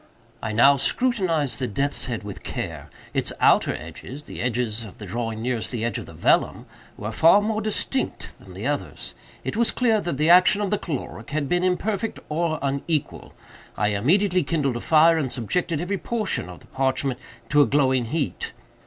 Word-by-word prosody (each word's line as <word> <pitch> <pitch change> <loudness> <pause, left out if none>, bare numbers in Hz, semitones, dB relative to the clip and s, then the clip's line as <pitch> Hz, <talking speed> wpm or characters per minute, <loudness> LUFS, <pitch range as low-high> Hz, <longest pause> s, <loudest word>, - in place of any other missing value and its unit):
"I 110 - -3
now 135 +6 +5
scrutinized 165 - +1
the 130 - -1
death's 140 +7 -1
head 120 -4 -4
with 105 -1 -7
care. - - -5 0.2
Its - - +1
outer - - +4
edges—the 145 +4 -8
edges 115 -2 -1
of 105 -4 -11
the 105 - -8
drawing 115 +2 -4
nearest 120 -2 -1
the 115 -3 -2
edge 120 - -2
of - - -9
the - - -11
vellum—were 105 +1 -1
far 165 - +6
more 215 +1 -1
distinct 220 +5 -2
than - - -14
the - - -6
others. - - -3 0.3
It - - -3
was 235 +1 +3
clear 225 -4 +2
that 170 -7 -3
the 150 - +2
action 185 +3 +6
of 205 -2 -1
the 210 - +1
caloric 135 -7 -5
had 145 -1 -1
been 175 +4 +1
imperfect 200 +4 -1
or 160 +1 0
unequal. 140 +2 -2 0.4
I 105 +1 +2
immediately 180 - +2
kindled 140 -5 0
a - - -6
fire, 160 +1 +5
and 135 -5 -2
subjected 155 - -1
every 185 +3 -2
portion 215 - -1
of 90 - -11
the - - -17
parchment 130 -1 -1 0.3
to 150 -1 +5
a 140 - +4
glowing 130 -1 +2
heat. 145 +4 -3
145 Hz, 180 wpm, -24 LUFS, 120-180 Hz, 0.4 s, far